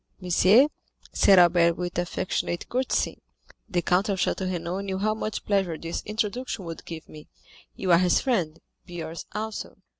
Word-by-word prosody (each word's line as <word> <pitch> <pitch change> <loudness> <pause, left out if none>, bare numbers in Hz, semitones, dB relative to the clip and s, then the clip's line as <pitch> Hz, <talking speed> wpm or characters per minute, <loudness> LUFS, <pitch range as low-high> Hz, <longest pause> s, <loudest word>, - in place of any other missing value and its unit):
"Monsieur," 185 +7 +5 0.5
said 195 - +5
Albert 170 -1 +5
with 175 -1 -3
affectionate 175 0 -2
courtesy, 255 +2 -1 0.5
"the 175 -4 0
count 190 +4 +2
of 195 - 0
Château 185 0 -1
Renaud 175 +1 -3
knew 195 -1 -3
how 215 +2 +1
much 215 0 -4
pleasure 195 -5 0
this 165 +1 -4
introduction 215 -1 -3
would 165 -1 -8
give 165 -2 -8
me; 155 -1 -13 0.5
you 185 -2 -1
are 170 - +7
his 180 -1 +3
friend, 180 - 0 0.3
be 175 -2 -6
ours 160 +1 -7
also." 220 +1 -5
185 Hz, 160 wpm, -26 LUFS, 170-210 Hz, 0.5 s, are